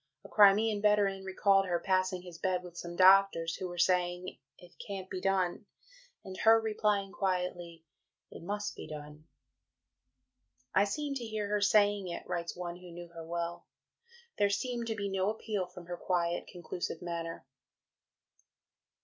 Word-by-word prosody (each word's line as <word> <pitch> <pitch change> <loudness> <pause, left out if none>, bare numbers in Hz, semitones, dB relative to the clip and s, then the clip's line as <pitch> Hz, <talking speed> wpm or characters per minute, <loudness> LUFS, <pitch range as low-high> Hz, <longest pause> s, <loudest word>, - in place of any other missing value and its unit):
A - - -11
Crimean 210 +1 +5
veteran 205 -2 +2
recalled 195 0 +3
her 175 -1 0
passing 185 -1 0
his 175 -2 -11
bed 185 -1 0
with 175 -1 -11
some 175 0 -7
doctors, 185 -3 +5
who 185 - -4
were 175 0 -8
saying, 180 0 +1 0.2
"It 175 -1 -16
can't 195 -2 -6
be 185 - -4
done," 195 +1 0 0.6
and 190 - -7
her 225 0 +6
replying 210 -3 0
quietly, 180 -4 -2 0.5
"It - - -10
must 205 +4 -3
be - - -8
done." 150 +1 -9 1.5
"I 195 - +5
seem 285 +7 -3
to 265 -3 -4
hear 215 -2 -3
her 210 0 +1
saying 205 -1 +3
it," 170 - -6
writes 170 -1 -3
one 175 -1 -5
who 180 0 -12
knew 175 0 -9
her 165 -1 -9
well; 170 +1 -4 0.7
"there 205 - +4
seemed 235 +3 -2
to 225 - -1
be 200 -1 -3
no 195 0 0
appeal 210 -3 -3
from 180 -1 -12
her 175 0 -5
quiet 175 -1 -1
conclusive 175 -1 -5
manner." 165 -3 -5
185 Hz, 160 wpm, -32 LUFS, 175-205 Hz, 1.5 s, her